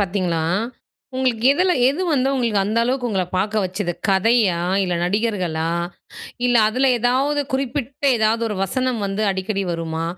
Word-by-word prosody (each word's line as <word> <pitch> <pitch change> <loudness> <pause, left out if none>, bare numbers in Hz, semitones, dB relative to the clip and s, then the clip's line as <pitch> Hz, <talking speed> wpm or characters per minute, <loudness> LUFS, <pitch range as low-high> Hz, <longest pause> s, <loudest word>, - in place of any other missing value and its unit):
பார்த்தீங்ன்னா, 180 -4 -1 0.7
உங்களுக்கு 250 -3 +1
எதுல 365 +5 +2 0.2
எது 295 +7 -1
வந்து 265 -2 +2
உங்களுக்கு 230 -6 +1
அந்த 215 +3 0
அளவுக்கு 250 0 -1
உங்கள 190 -3 0
பார்க்க 210 +2 0
வச்சது? 185 -1 -3 0.2
கதையா, 195 -1 +3 0.2
இல்ல 180 -2 -1
நடிகர்களா, 180 -5 -1 0.8
இல்ல 245 -1 +3
அதுல 255 +5 +1
எதாவது 265 +5 +1
குறிப்பிட்ட 270 +1 -3
ஏதாவது 220 +1 +1
1 210 - -4
வசனம் 255 +2 -2
வந்து 200 +2 -2
அடிக்கடி 195 +1 -2
வருமா? 165 -1 -3
215 Hz, 140 wpm, -21 LUFS, 190-255 Hz, 0.8 s, கதையா